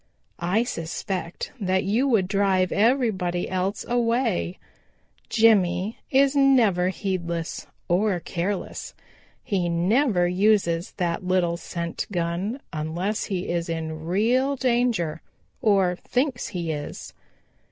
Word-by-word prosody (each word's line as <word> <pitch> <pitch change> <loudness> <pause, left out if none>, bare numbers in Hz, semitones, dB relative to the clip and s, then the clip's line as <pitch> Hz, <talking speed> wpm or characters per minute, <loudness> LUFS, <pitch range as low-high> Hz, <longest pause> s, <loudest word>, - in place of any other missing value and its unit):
I 185 +7 +1
suspect 175 -2 -4
that 190 -2 +1
you 220 +8 +1
would 215 -8 +2
drive 195 -2 +2
everybody 205 -6 +1
else 185 +2 -2
away. 235 -6 0 0.7
Jimmy 205 -3 +3
is 275 +1 +4
never 235 -10 +4
heedless 170 -3 -3 0.2
or 185 +1 +2
careless. 185 +4 -4 0.5
He 190 -7 0
never 180 +3 +2
uses 180 -2 +2
that 175 -1 -2
little 180 -2 +1
scent 170 -1 -4
gun 180 +8 -2
unless 170 +7 -2
he 190 -3 -3
is 170 -1 -1
in 160 -1 -4
real 245 +9 +2
danger 235 - 0 0.4
or 195 -4 +3
thinks 255 +2 -1
he 170 -3 -3
is. 145 -1 -6
185 Hz, 110 wpm, -25 LUFS, 175-225 Hz, 0.7 s, is